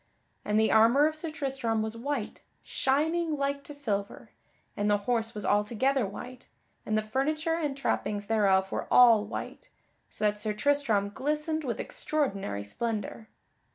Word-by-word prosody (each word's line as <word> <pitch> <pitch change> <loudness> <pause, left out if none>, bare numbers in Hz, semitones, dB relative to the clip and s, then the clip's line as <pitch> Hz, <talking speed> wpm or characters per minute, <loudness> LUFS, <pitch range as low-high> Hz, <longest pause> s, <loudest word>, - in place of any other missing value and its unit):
And 210 +1 +1
the 220 -1 +3
armor 230 +6 +5
of 310 0 0
Sir 315 +1 -4
Tristram 265 -7 -1
was 220 +1 -4
white, 245 -1 -4 0.2
shining 315 +4 0
like 280 0 -1
to - - -8
silver, 210 -9 -4 0.4
and 205 0 0
the 205 - +4
horse 230 -2 0
was 210 - -4
altogether 225 +4 +1
white, 250 +5 -9 0.4
and 215 - +1
the 215 - 0
furniture 305 +8 -1
and 300 -4 -2
trappings 205 -6 -1
thereof 195 -3 +2
were - - -3
all 230 -4 +7
white, - - -7 0.4
so 215 - -3
that 210 0 +1
Sir 215 0 -1
Tristram 215 -4 +1
glistened 300 +4 -1
with 245 -4 -3
extraordinary 195 - -2
splendor. 220 - -4
235 Hz, 155 wpm, -29 LUFS, 210-285 Hz, 0.4 s, all